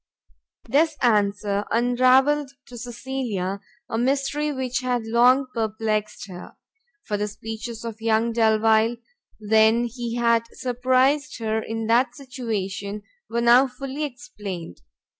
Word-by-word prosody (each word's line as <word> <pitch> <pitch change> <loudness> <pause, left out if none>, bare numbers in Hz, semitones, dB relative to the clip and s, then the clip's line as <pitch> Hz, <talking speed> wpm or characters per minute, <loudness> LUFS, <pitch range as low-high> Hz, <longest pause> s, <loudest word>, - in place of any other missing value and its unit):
This 305 +5 +2
answer 205 -2 +2
unravelled 255 +4 +3
to 250 - -12
Cecilia 235 -6 -4 0.3
a 225 - -2
mystery 275 +4 0
which 255 -2 -2
had 250 -2 -1
long 245 +4 +4
perplext 215 -2 -2
her; 180 -2 -10 0.5
for 205 - -2
the 210 +1 -1
speeches 225 +2 -7
of 225 -1 -7
young 225 +1 +2
Delvile 220 0 +3 0.4
when 220 +2 +3
he 240 0 -4
had 235 -1 +2
surprised 260 +3 +1
her 220 -1 -1
in 225 0 -4
that 235 +4 +2
situation 210 -7 -4 0.3
were 235 +1 -1
now 240 +3 +6
fully 270 +3 -6
explained. 210 - -7
235 Hz, 120 wpm, -24 LUFS, 220-255 Hz, 0.5 s, now